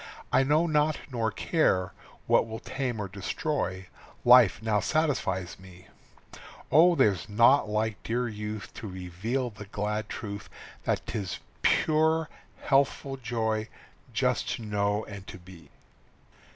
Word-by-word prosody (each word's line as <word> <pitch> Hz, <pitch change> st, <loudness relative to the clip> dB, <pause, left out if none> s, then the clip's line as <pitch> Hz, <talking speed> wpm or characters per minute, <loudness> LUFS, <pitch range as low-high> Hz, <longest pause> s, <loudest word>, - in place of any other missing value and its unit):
I 130 Hz, -, +6 dB
know 150 Hz, +5 st, +3 dB
not 155 Hz, -1 st, +2 dB
nor 115 Hz, -3 st, 0 dB
care 95 Hz, -, +1 dB, 0.3 s
what -, -, +3 dB
will 110 Hz, 0 st, -5 dB
tame 125 Hz, -2 st, -3 dB
or 105 Hz, -, -3 dB
destroy, 95 Hz, -, -3 dB, 0.4 s
Life 120 Hz, -5 st, +7 dB
now 110 Hz, -2 st, +1 dB
satisfies 140 Hz, -, -1 dB
me. 95 Hz, 0 st, -15 dB, 0.8 s
Oh, 170 Hz, +3 st, +6 dB
there's 100 Hz, -, +2 dB
naught 115 Hz, +3 st, +5 dB
like 105 Hz, 0 st, -1 dB
dear 120 Hz, +2 st, -1 dB
youth 105 Hz, 0 st, -6 dB
To 110 Hz, -, -6 dB
reveal 95 Hz, +8 st, -3 dB
the 105 Hz, 0 st, -10 dB
glad 105 Hz, +1 st, -3 dB
truth 100 Hz, -1 st, -6 dB, 0.4 s
That -, -, 0 dB
'tis 100 Hz, -5 st, -4 dB, 0.2 s
pure, 160 Hz, 0 st, +2 dB, 0.3 s
healthful 135 Hz, 0 st, +1 dB
joy 110 Hz, -3 st, -2 dB, 0.4 s
just -, -, 0 dB
to 115 Hz, -, -9 dB
know 105 Hz, 0 st, 0 dB
and 100 Hz, -2 st, -10 dB
to -, -, -8 dB
be! 90 Hz, -1 st, -15 dB
110 Hz, 130 wpm, -28 LUFS, 100-135 Hz, 0.8 s, Life